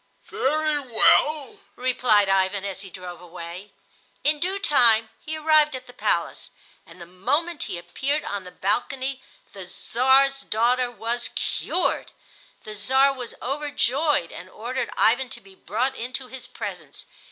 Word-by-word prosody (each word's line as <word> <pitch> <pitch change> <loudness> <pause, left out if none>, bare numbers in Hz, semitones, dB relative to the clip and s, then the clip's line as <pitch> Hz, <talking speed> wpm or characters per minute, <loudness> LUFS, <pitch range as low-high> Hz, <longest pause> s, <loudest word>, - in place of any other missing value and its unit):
"Very 305 +2 +1
well," 290 - +3 0.2
replied 245 -5 +3
Ivan, 195 +1 +1
as 195 -1 -4
he 195 - -9
drove 180 -2 -9
away. 175 +3 -9 0.5
In 295 +1 +2
due 370 +4 -1
time 230 - +4
he 315 0 -4
arrived 305 -2 +4
at 255 0 -7
the 250 - -14
palace, - - -1 0.4
and 170 +2 -15
the 170 - -9
moment 285 - -1
he - - -3
appeared 270 - -2
on 205 -6 -4
the 180 - -9
balcony 260 +8 -2 0.3
the 190 -2 -9
Czar's 265 +7 +3
daughter 245 +2 +1
was 235 +1 -3
cured. - - -1 0.5
The 215 - -8
Czar 265 +7 +3
was 250 -3 -7
overjoyed 285 - 0
and 180 +2 -9
ordered 245 +6 -4
Ivan 245 +3 +3
to - - -9
be 195 0 -18
brought 225 +8 -1
into 255 +2 -5
his 255 0 -8
presence. 190 - -7
245 Hz, 145 wpm, -24 LUFS, 195-275 Hz, 0.5 s, time